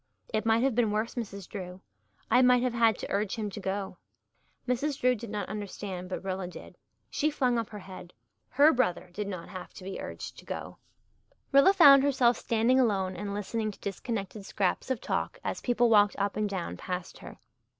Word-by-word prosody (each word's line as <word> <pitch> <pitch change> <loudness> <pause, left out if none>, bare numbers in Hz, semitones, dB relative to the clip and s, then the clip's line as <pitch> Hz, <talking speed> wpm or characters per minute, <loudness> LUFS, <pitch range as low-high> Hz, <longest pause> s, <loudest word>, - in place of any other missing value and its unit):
"It 220 +1 0
might 225 +2 +3
have 270 -1 +2
been 230 -1 +2
worse, 215 +2 -1
Mrs. 200 -6 -6
Drew. 185 -3 -7 0.5
I 250 - +6
might 250 -1 +5
have 250 -2 0
had 230 -2 +3
to - - -7
urge 200 0 0
him 215 -3 -3
to 205 - -7
go." 195 -1 -3 0.7
Mrs. 275 +3 -1
Drew 250 0 +4
did 235 -1 -7
not 205 -2 -3
understand 195 -3 -6
but 185 - -4
Rilla 190 -1 -3
did. 180 - -11 0.4
She 305 - +1
flung 255 -5 +1
up 225 - -4
her 210 - -8
head. 185 -2 -10 0.4
Her 290 +5 +5
brother 210 -9 0
did 210 +1 -4
not 185 -4 -6
have 185 -1 -9
to - - -10
be 190 +1 -6
urged - - -7
to - - -15
go. - - -6 0.7
Rilla 275 +7 +7
found 285 -8 +8
herself 260 -4 +3
standing 235 +3 +2
alone 195 -6 +1
and 200 +2 -5
listening 215 +2 -2
to 205 - -10
disconnected 200 0 -4
scraps 195 +4 -1
of 260 -2 -1
talk - - -2
as - - -3
people 245 -1 +2
walked 205 -2 +5
up 200 0 -1
and 215 -1 0
down 190 -3 -4
past 180 -1 -5
her. - - -11
215 Hz, 200 wpm, -29 LUFS, 195-245 Hz, 0.7 s, found